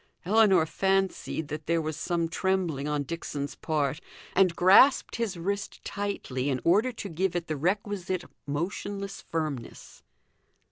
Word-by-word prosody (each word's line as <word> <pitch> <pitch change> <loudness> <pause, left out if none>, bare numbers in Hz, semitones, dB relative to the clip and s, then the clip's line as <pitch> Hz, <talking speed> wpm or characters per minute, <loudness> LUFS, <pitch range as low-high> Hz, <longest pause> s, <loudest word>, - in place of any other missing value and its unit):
Ellinor 195 -4 +5
fancied 190 -3 0
that 150 0 -6
there 170 0 +2
was 155 -1 -3
some 170 +1 -1
trembling 170 -5 -1
on 150 -1 0
Dixon's 145 -2 -4
part, 150 -1 -1 0.3
and 185 -3 +4
grasped 195 +10 +6
his 220 -6 -2
wrist 200 +4 -4
tightly 170 -10 -3
in 130 -2 0
order 210 +9 +4
to 215 - -6
give 185 +1 -1
it 175 -1 -1
the 155 - -3
requisite 185 +2 -1 0.2
motionless 195 +6 -3
firmness. 155 -7 -5
175 Hz, 135 wpm, -28 LUFS, 155-195 Hz, 0.3 s, grasped